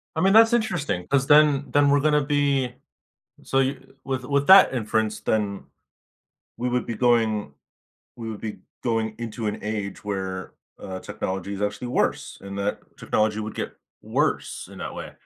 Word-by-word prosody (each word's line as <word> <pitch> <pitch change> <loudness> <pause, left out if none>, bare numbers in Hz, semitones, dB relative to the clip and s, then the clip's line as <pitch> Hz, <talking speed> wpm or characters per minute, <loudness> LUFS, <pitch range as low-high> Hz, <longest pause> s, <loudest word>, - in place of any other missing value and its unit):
I 160 - 0
mean, 195 +2 +4
that's 225 +1 +7
interesting 175 - -1
'cause 135 -1 +1
then 145 -2 +5
then 145 0 +4
we're 145 0 +4
gonna 150 0 +3
be 140 -3 +1 0.7
so 135 - 0
you 135 +1 -3
with 130 -2 -3
with 140 +1 0
that 190 -6 +8
inference, 110 -2 -1
then 100 -3 -1 0.9
we 125 +1 -2
would 125 0 -1
be 115 - -3
going 110 - +1 0.6
we 115 -2 -6
would 105 - -7
be 110 -2 -5 0.2
going 115 -2 -1
into 115 -1 -4
an 105 0 -2
age 105 -2 -4
where, 95 -2 -4 0.3
uh, 95 -1 -7
technology 95 +1 -4
is 100 - -7
actually 105 +4 -2
worse - - -1
and 100 0 -7
that 100 +1 -1 0.2
technology 110 0 0
would 110 0 -5
get - - -4 0.3
worse - - -1
in - - -11
that - - -6
way. - - -7
115 Hz, 170 wpm, -24 LUFS, 105-140 Hz, 0.9 s, that